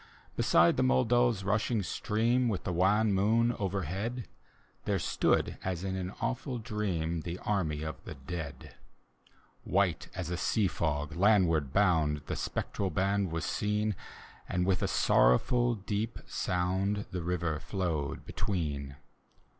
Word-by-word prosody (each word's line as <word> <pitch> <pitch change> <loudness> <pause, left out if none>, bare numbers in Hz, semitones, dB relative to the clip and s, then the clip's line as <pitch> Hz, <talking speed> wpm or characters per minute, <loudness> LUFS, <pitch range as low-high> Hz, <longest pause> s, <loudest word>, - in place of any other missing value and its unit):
Beside - - +4
the - - +2
Mc4dau's 110 - +3
rushing 105 +2 +1
stream, 120 +6 +1
With 100 - -2
the 90 - -2
wan 100 +4 +3
moon 110 +5 +3
overhead, 100 - -3 0.6
There - - +1
stood, - - +1
as 90 -2 -2
in 95 -1 -2
an 95 -1 -3
awful 125 +2 -2
dream, 95 -8 -2
The 85 +2 -5
anny 80 -7 0
of 80 -2 -6
the - - -8
dead. 70 +2 -7 0.9
White 95 -5 +1
as 90 -2 -4
a 90 - -1
sea 95 +3 +1
fc%, 75 -3 -2
landward 90 -7 +3
bound. 80 -7 +2
The - - -3
spectral 100 - -2
band 100 -1 0
was 80 0 -2
seen. 105 0 0 0.5
And 90 0 0
with 95 -1 +1
a - - +1
sorrowful 120 - +3
deep 105 +2 -3
sound. 95 +3 -1
The 90 - -3
river 85 -3 -1
flowed 80 -8 -3
between. 70 -8 -3
95 Hz, 135 wpm, -31 LUFS, 80-105 Hz, 0.9 s, Beside